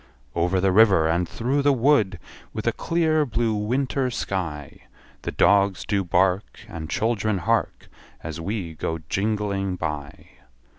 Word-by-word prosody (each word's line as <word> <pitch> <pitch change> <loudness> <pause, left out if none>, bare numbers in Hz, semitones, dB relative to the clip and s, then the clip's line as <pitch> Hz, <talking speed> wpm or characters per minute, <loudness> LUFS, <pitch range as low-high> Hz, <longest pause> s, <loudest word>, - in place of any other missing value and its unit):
Over 90 +2 +1
the 95 +1 +2
river, 95 -5 +5
and 85 +2 0
through 130 +5 0
the 145 +1 +4
wood, 120 -7 +3 0.4
With - - -5
a - - +3
clear 160 -2 +1
blue 115 -4 0
winter 130 +5 0
sky, 85 - -4 0.4
The - - -4
dogs 100 -1 +3
do 100 -2 0
bark, 90 +3 0
And 80 -1 -7
children 110 -1 0
hark, 110 +6 -1 0.4
As 80 +1 -5
we 95 -2 -4
go 80 +1 -3
jingling 100 -2 -1
by. 75 -4 -5
100 Hz, 140 wpm, -24 LUFS, 90-115 Hz, 0.4 s, river